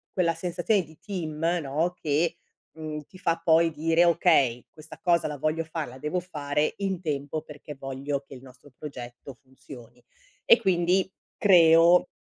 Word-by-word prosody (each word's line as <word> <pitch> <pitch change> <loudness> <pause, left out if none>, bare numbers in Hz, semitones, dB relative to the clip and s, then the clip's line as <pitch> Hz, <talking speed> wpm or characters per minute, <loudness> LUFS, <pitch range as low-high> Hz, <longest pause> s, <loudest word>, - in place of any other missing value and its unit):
quella 170 -3 +2
sensazione 180 +4 0
di 160 0 -18
team, 160 -6 -6 0.2
no, 155 +6 -1
che, 155 +3 0 0.4
mhmm, 155 -1 -5
ti 185 - -16
fa 165 -2 -1
poi 165 0 +4
dire: 165 +3 +2
"Okay, 155 -8 +3
questa 155 0 -13
cosa 170 -5 +2
la 150 -1 -5
voglio 155 +3 -1
fare, 160 -1 -5
la 130 - -12
devo 150 +6 -2
fare 150 -3 -2
in 190 -3 -2
tempo 150 -1 -3
perché 150 -1 -11
voglio 135 +1 -4
che 135 - -12
il 125 - -12
nostro 135 +1 -17
progetto 125 -3 -9
funzioni". 130 -2 -15 0.4
E - - +7
quindi 185 0 +1 0.3
creo 170 -2 +6
155 Hz, 155 wpm, -26 LUFS, 145-175 Hz, 0.4 s, E